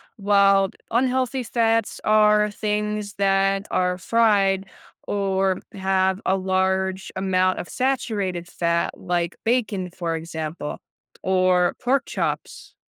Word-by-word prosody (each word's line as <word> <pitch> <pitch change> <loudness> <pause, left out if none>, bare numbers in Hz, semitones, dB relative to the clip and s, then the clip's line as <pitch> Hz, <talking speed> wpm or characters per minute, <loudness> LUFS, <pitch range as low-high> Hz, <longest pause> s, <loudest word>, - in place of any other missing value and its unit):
while 200 -1 +4 0.2
unhealthy 255 +1 +1
fats 225 -1 0
are 210 0 +4
things 210 0 -2
that 195 0 +1
are 180 0 +1
fried 195 -2 +2 0.4
or 195 -2 0 0.2
have 190 0 0
a 190 +1 +2
large 190 0 -1
amount 185 -1 +1
of - - -6
saturated 205 -9 -2
fat, 170 -1 -1
like 175 -1 -2
bacon, 215 -6 0
for 170 -2 -3
example, 160 -1 -5 0.4
or 185 -1 +2
pork 260 +2 +2
chops. - - -4
195 Hz, 105 wpm, -23 LUFS, 185-210 Hz, 0.4 s, while